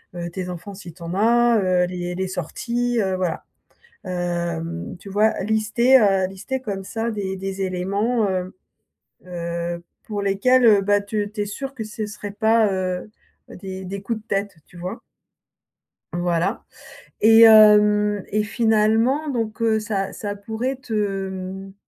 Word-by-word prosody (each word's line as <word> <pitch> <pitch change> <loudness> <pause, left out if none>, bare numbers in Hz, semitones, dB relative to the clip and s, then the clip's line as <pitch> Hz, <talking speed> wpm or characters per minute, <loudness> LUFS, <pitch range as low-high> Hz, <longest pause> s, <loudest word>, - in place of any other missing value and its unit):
heu, 175 0 -4
tes 180 0 -5
enfants 180 +3 -7
si 180 -4 -10
tu 175 - -20
en 170 - -5
as, 235 +2 +4
heu, 180 -1 +2
les 180 -1 -4
les 190 +1 -2
sorties, 235 +7 -2
heu, 190 -2 0
voilà. 180 -3 -2 0.6
Hem, 170 -2 -3
tu 200 - -11
vois? 210 +3 +2
Lister, 220 +5 +3
heu, 195 -3 +3
lister 210 +8 -5
comme 200 -5 -4
ça 225 +4 -3
des 195 -2 -3
des 195 0 -5
éléments, 200 +5 0
heu 185 0 -3 0.7
heu, 170 -1 -4 0.2
pour 205 -2 -4
lesquels, 245 +6 +3
heu, 205 -3 +6
bah, 205 +1 +3
tu 205 0 -3
tu 210 - -5
es - - -3
sûre 270 +6 -6
que 230 - -5
ce 215 0 -5
serait 210 -1 -7
pas, 220 -1 +3
heu, 185 +2 -3 0.4
des 190 -1 -8
des 195 +1 -6
coups 225 +2 -3
de 220 - -26
tête, 200 -2 -2
tu - - -18
vois? 185 +6 -6 1.1
Voilà 175 +1 -1 0.6
et 225 +1 +7
hem, 210 -2 +6
et 210 +1 0
finalement 225 +6 +2
donc 225 -4 -3
heu, 220 -1 +3
ça 200 -3 -3
ça 205 -3 -5
pourrait 225 +6 -3
te 205 -6 -2
mmh, 190 +1 -7
200 Hz, 160 wpm, -22 LUFS, 185-220 Hz, 1.1 s, et